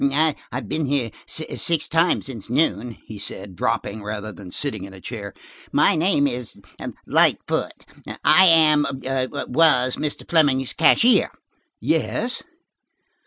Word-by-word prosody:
"I 145 +2 +2 0.2
have 125 -3 -5
been 155 +4 -2
here 130 -5 -1 0.2
six 160 0 0
times 165 +2 +1
since 120 -7 -5
noon," 120 - 0
he 105 -2 -9
said, 100 -1 -5
dropping 105 +4 -2
rather 105 +1 -5
than 100 -3 -11
sitting 110 -1 -4
in 95 0 -10
a - - -12
chair. 100 0 -7 0.4
"My - - +3
name 160 -3 +2
is 125 -4 -4 0.5
Lightfoot. - - 0 0.4
I 190 - +6
am–was–Mr. 140 -2 +2
Fleming's 140 -6 +2
cashier." 230 +9 +4 0.5
"Yes?" 250 +2 -1
135 Hz, 120 wpm, -22 LUFS, 110-155 Hz, 0.5 s, I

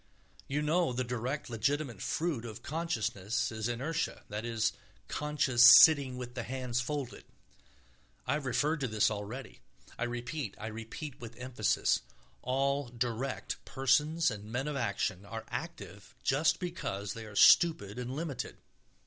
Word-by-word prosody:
You 145 +2 -1
know 160 -1 +2
the 130 +1 -1
direct, 125 +4 -3
legitimate 120 0 -1
fruit 155 -8 -1
of 110 -2 -8
consciousness 130 - -1
is 110 0 -3
inertia, 150 +8 -2
that 105 +2 -4
is, 115 -1 0 0.3
conscious 145 -5 +2 0.2
sitting 140 -5 +6
with 125 -1 -6
the 120 - -3
hands 125 0 -2
folded. 135 -1 -4 1.0
I 130 - +1
have 150 -3 -2
referred 145 +6 +1
to 135 - -1
this 110 -1 +2
already. 105 - -6 0.4
I 115 - +1
repeat, 120 -1 -4
I - - -6
repeat 115 +6 -7
with 115 0 -9
emphasis: 125 - +1 0.4
all 140 +2 0
"direct" 120 +2 -3
persons 150 +4 +2
and 105 -1 -7
men 125 +6 -3
of 150 - -2
action 100 -6 -1
are 110 +2 -7
active - - -7
just 145 +4 +2
because 100 - -4
they 115 -1 -8
are 105 - -11
stupid 120 - +5
and 125 +1 -4
limited. 150 -4 -4
125 Hz, 145 wpm, -31 LUFS, 115-145 Hz, 1.0 s, sitting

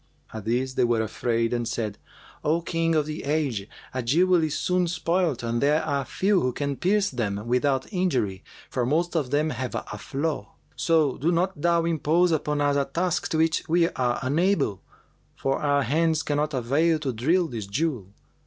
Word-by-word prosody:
At 110 -2 -7
this 125 +3 0
they - - +2
were 120 -2 +2
afraid 115 +1 -1
and 120 -1 -1
said, 110 -4 -3 0.4
'O 160 +3 +1
King 165 -1 0
of 155 -2 +2
the 155 0 -5
age, 140 -9 -1 0.2
a 130 - -1
jewel 170 +8 +3
is 155 -2 -1
soon 180 -1 +1
spoilt 170 -5 0
and 115 0 -1
there 150 +3 +3
are 140 -1 -1
few 195 -1 +1
who 125 -1 0
can 140 +1 -2
pierce 200 +6 +1
them 105 -4 -2
without 130 +2 +1
injury, 130 - 0 0.2
for 125 - -2
most 165 +8 0
of 145 -6 0
them 150 +3 +1
have 130 -3 -4
a - - -5
flaw. 140 -6 -3 0.2
So 160 -5 +2
do 160 +5 +2
not 180 -1 0
thou 170 0 +2
impose 165 +2 +2
upon 150 -2 0
us 145 0 +2
a 140 - +1
task 170 +5 -1
to 160 - 0
which 160 0 +2
we 170 +1 +3
are 125 -5 -1
unable; 150 - +1 0.5
for 135 0 -1
our 140 -1 +2
hands 160 +3 +1
cannot 150 0 -1
avail 145 +7 +2
to 140 -4 -3
drill 165 +11 +2
this 115 -8 -6
jewel. 125 - -1
145 Hz, 185 wpm, -25 LUFS, 125-165 Hz, 0.5 s, jewel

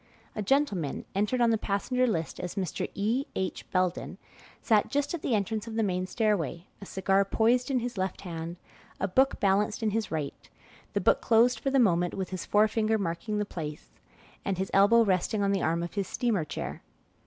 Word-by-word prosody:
A 215 - -2
gentleman, 205 - 0
entered 210 +6 0
on 235 -1 +4
the 225 - +1
passenger 250 +6 0
list 165 -8 -2
as 180 0 -5
Mr. 185 -5 -2
E. 225 +7 0
H. 190 -1 -3
Belden, 185 -1 -1 0.4
sat 215 -3 +2
just 285 +2 0
at 340 - -3
the 240 - +1
entrance 215 +2 -2
of 225 - -6
the 225 - +1
main 185 -2 -1
stairway, 185 - 0 0.2
a 200 - -8
cigar 195 +1 +2
poised 235 +6 +2
in 270 - +1
his 240 -4 -4
left 185 0 -2
hand, 170 -1 -6 0.4
a 195 - 0
book 265 +8 +2
balanced 205 +2 +1
in 215 - +2
his 220 0 -1
right; 150 -3 -5 0.4
the - - 0
book - - +3
closed 230 +1 +4
for 270 - -1
the 270 - +2
moment, 175 -7 +3
with 190 -2 -4
his 185 -2 -5
forefinger 215 +1 +3
marking 200 +3 -2
the 210 - 0
place, 155 -6 -7 0.5
and 195 -2 -1
his 190 +1 -3
elbow 205 +4 +6
resting 200 +1 +1
on 200 - +2
the 195 -2 +1
arm 165 +1 0
of 170 - -6
his 200 -2 -2
steamer 220 -10 0
chair. 145 - -5
200 Hz, 200 wpm, -28 LUFS, 185-225 Hz, 0.5 s, elbow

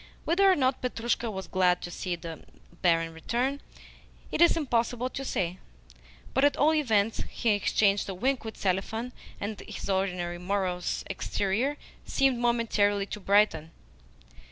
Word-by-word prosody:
Whether 385 +4 +4
or - - +4
not 260 -3 +1
Petrushka 235 -1 -1
was 190 -2 -5
glad 180 -1 +2
to 175 - -5
see 180 0 -3
the 165 -2 -8 0.4
barin 165 -2 +2
return 245 - -1 0.7
it - - -1
is 340 - +6
impossible 245 -3 0
to 270 - -5
say, 185 -7 -2 0.7
but 265 - +2
at 285 - +4
all 310 +2 +4
events 225 -8 +2
he 235 - -1
exchanged 205 -1 +2
a 190 - -4
wink 260 +7 0
with 220 -1 -7
Selifan, 215 +6 -1 0.3
and 205 0 -4
his - - -5
ordinarily 180 -2 -1
morose 185 -2 -1
exterior 205 +8 -1 0.3
seemed 270 -3 +1
momentarily 220 -4 +2
to 210 - -6
brighten. 195 -5 +3
205 Hz, 145 wpm, -28 LUFS, 185-250 Hz, 0.7 s, is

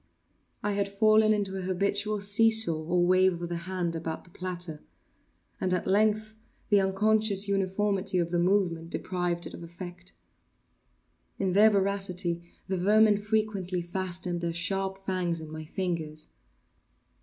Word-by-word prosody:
I 210 - 0
had 200 0 0
fallen 215 +2 +4
into 200 -2 0
an - - -3
habitual 200 +3 0
see 205 +3 +4
saw, 195 -8 +2
or 175 +1 +2
wave 185 -1 +3
of 170 0 -5
the 175 - -2
hand 175 -3 -2
about 160 0 -4
the 175 - -18
platter; 175 -4 -5 0.8
and, 185 -1 +1
at 180 - -3
length, 215 +2 +2 0.4
the 205 -2 +5
unconscious 205 +1 +1
uniformity 195 0 0
of 170 -1 0
the 175 - +1
movement 175 -3 +1
deprived 175 -1 -2
it - - -8
of - - -9
effect. 175 +1 -9 1.2
In 190 -2 0
their 210 +3 +7
voracity 195 -4 0 0.3
the 190 - -1
vermin 210 +3 +4
frequently 205 -4 -1
fastened 175 0 -3
their 170 -1 -2
sharp 195 +3 -1
fangs 180 -3 -1
in 160 -1 -9
my 155 0 -7
fingers. 160 -3 -4
185 Hz, 145 wpm, -28 LUFS, 175-200 Hz, 1.2 s, their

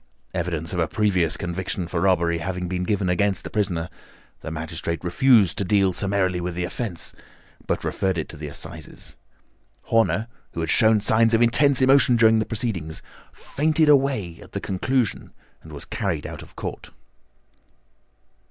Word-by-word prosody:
Evidence 85 -2 -3
of 90 - -2
a 80 - +2
previous 90 -6 +1
conviction 90 0 -3
for 85 -1 -2
robbery 85 -3 +2
having 90 +1 -3
been 90 0 -2
given 100 0 0
against 95 +2 +1
the - - -7
prisoner, 90 -5 -1 0.5
the - - -6
magistrate 80 +1 -4
refused 105 +1 +4
to - - +1
deal 100 -1 +2
summarily 95 -2 0
with 90 0 -4
the 90 - -2
offence, 95 0 -3 0.5
but - - -1
referred 95 -2 -1
it 80 - -2
to - - -10
the 75 0 -7
Assizes. 70 - -8 0.7
Horner, 115 0 +1 0.3
who - - -5
had 80 - -1
shown 110 -2 +4
signs 115 +2 +3
of 115 - +2
intense 135 +3 +3
emotion 135 -1 +5
during 110 -1 +5
the 110 - -1
proceedings, 105 -8 -3 0.3
fainted 155 +1 +1
away 135 - +2
at - - -15
the - - -2
conclusion 120 +4 -1 0.3
and 80 - -13
was 70 -2 -6
carried - - -2
out - - -7
of - - -15
court." - - -6
95 Hz, 160 wpm, -23 LUFS, 85-110 Hz, 0.7 s, emotion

